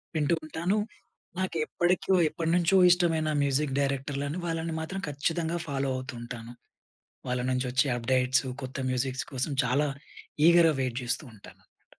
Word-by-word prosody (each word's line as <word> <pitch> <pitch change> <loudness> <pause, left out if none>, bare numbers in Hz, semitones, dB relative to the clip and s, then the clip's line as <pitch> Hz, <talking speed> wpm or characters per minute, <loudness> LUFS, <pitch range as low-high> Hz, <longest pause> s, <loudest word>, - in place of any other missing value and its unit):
వింటూ 155 +2 +2
ఉంటాను. 170 +6 -1 0.6
నాకెప్పడి‌కో 180 +1 +1
ఎప్పటినుంచో 170 +3 +2
ఇష్టమైన 165 -3 +2
మ్యూజిక్ 140 0 +1
డైరెక్టర్లని 140 +2 -2
వాళ్ళని 165 -1 -2
మాత్రం 190 +4 -4
ఖచ్చితంగా 165 +4 -1
ఫాలో 135 -1 -1
అవుతూ 130 +1 -5
ఉంటాను. 120 -1 -7 0.8
వాళ్ళ‌నుంచి 125 +1 0
వచ్చే 130 +3 +2
అప్‌డేట్స్, 130 +2 +2 0.2
కొత్త 130 +1 -6
మ్యూజిక్స్ 130 +1 -1
కోసం 130 +3 -1
చాలా 140 +5 +2 0.6
ఈగర్‌గా 170 -2 +6
వెయిట్ 125 -1 -2
చేస్తూ 130 +5 -1
ఉంటానన్నమా‌ట. 100 - -18
145 Hz, 120 wpm, -28 LUFS, 130-165 Hz, 0.8 s, ఈగర్‌గా